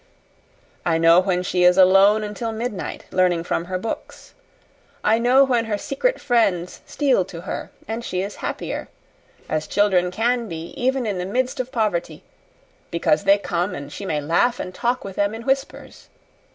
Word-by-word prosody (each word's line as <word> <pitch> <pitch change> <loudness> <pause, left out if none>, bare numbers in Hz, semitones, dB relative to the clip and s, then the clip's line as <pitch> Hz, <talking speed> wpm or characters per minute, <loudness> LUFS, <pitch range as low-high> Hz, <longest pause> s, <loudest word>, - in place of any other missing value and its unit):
I 165 -2 +1
know 165 +1 +6
when 180 -1 0
she 180 -1 0
is 180 +1 +5
alone 195 +3 +6
until 210 +2 -4
midnight, 220 -2 -5
learning 180 -2 +2
from 170 0 -2
her 185 +1 -3
books; 220 +5 -7 0.7
I 220 +2 +3
know 250 +3 +5
when 245 -4 +1
her 215 -2 -1
secret - - -1
friends 195 -8 0
steal 270 -9 +2
to 170 -3 -9
her 180 - -5 0.2
and 225 +2 -4
she 185 -4 -2
is 200 +1 -6
happier - - -4 0.6
as 155 0 -2
children 190 -3 +2
can 235 +5 0
be, 165 -2 -6
even 260 -1 0
in 200 -4 -2
the 180 - -2
midst 255 +6 -1
of 255 0 -3
poverty 190 - -2 0.7
because 170 +1 +1
they 200 +1 +6
come 180 -1 -2
and 140 +1 -8
she 200 - -6
may 150 - 0
laugh 175 +12 +1
and 185 - -5
talk 240 +5 -1
with 195 -1 -8
them 205 +1 +1
in 225 - -8
whispers. 270 +1 -3
200 Hz, 175 wpm, -22 LUFS, 180-235 Hz, 0.7 s, know